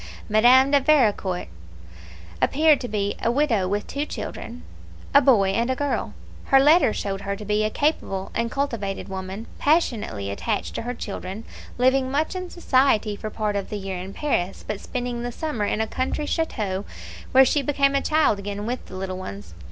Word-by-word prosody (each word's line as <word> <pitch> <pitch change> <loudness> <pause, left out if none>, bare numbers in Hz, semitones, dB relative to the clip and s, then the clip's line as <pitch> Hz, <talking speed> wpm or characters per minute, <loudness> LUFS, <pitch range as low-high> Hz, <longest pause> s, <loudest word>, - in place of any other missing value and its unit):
Madame 250 +5 +5
de 285 - +6
Vericourt 215 - +2 0.9
appeared 305 0 +4
to 245 - -3
be 205 -2 -1
a - - +1
widow 240 -7 +2
with 205 +2 -1
two 285 - -3
children, 245 -4 -7 0.5
a 280 - +8
boy 225 -8 +4
and 235 +6 0
girl. 285 -1 -2 0.3
Her 270 - +5
letters 295 -4 +5
showed 195 -1 -3
her 200 0 -3
to 210 +1 -9
be 210 +1 +1
a 215 - +1
capable 215 -9 -1
and 230 0 -1
cultivated 230 -9 -3
woman, 190 +3 -6
passionately 225 - +1
attached 210 - -2
to - - -3
her 245 +2 -4
children, 200 -1 -6 0.3
living 260 +1 +3
much 300 +6 -1
in 365 -1 -4
society 255 - +2
for 215 - -6
part 210 -1 -2
of 200 -1 -3
the 210 - -3
year 190 -2 -5
in 185 +2 -7
Paris, 195 -7 -2
but 210 - -4
spending 245 -1 -4
the 245 0 -3
summer 245 -6 -2
in 210 - 0
a - - +1
country 260 +6 -2
chateau, 210 - -2 0.5
where 265 0 +7
she 290 +3 +2
became 275 0 +2
a 275 - +2
child 305 -9 +2
again 205 +1 -5
with 245 +2 -3
the - - -10
little 185 0 -4
ones. 195 - -8
230 Hz, 185 wpm, -24 LUFS, 200-275 Hz, 0.9 s, a